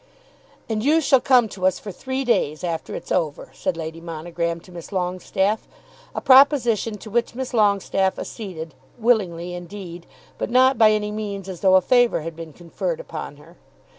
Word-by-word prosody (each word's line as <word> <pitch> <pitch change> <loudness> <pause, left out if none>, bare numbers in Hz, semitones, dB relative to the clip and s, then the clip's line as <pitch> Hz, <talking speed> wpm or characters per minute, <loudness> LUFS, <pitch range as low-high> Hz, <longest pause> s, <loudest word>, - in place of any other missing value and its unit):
"And 220 -1 -2
you 305 +4 +4
shall 275 -4 +4
come 250 -4 +4
to 185 -1 0
us 185 - +1
for 205 - -8
three 260 +7 -4
days, 155 -10 +1
after 170 -2 -3
it's - - -8
over," 155 -5 -1
said 185 -3 -2
Lady 160 0 -6
Monogram 170 +1 -3
to 180 - -17
Miss 170 -1 -9
Longestaffe; 190 +3 -1 0.5
a - - 0
proposition 245 -6 +5
to 215 +2 -11
which 235 +1 0
Miss 260 0 -5
Longestaffe 200 -3 +2
acceded, 165 - -7 0.2
willingly 185 -7 +1
indeed, 175 -1 -8 0.3
but - - -2
not 255 0 +4
by 220 -1 +7
any 210 -1 0
means 205 -2 -5
as 185 -3 -7
though 190 -1 +5
a 190 - +6
favour 245 0 +3
had 165 +1 -6
been 165 -1 -8
conferred 180 - -4
upon - - -7
her. - - -18
195 Hz, 175 wpm, -22 LUFS, 175-235 Hz, 0.5 s, by